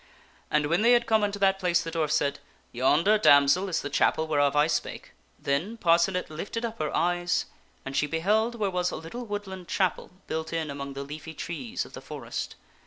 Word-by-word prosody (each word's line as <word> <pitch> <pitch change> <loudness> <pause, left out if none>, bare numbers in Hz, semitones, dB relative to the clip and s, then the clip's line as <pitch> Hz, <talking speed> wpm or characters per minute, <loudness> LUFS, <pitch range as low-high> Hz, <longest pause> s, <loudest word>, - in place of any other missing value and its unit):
And 150 0 +2
when 170 +6 +1
they 235 +2 +6
had 240 0 +3
come 220 -1 +3
unto 205 0 -1
that 195 -1 +2
place 180 -2 +2
the 165 - -5
dwarf 160 -2 -1
said, 140 -1 +1 0.2
" - - -36
Yonder, 170 +11 +4
damsel, 145 +2 +5
is 170 - -1
the 145 - -3
chapel 160 - +2
whereof 145 -2 +2
I 150 0 +5
spake." 155 -1 -3 0.3
Then 165 +12 -2
Parcenet 175 0 +2
lifted 205 +9 -4
up 230 -1 -6
her 155 -1 -1
eyes 175 +1 +1 0.4
and 135 0 -5
she 150 - +2
beheld 210 +10 +1
where 205 -4 -1
was 180 0 0
a - - -5
little 235 +10 -7
woodland 190 -3 -6
chapel 185 -4 0 0.2
built 160 +1 -4
in 160 -3 -2
among 140 0 -6
the 140 0 -5
leafy 155 +3 -8
trees 145 -10 -4
of - - -15
the - - -8
forest. - - -6
170 Hz, 205 wpm, -27 LUFS, 150-200 Hz, 0.4 s, they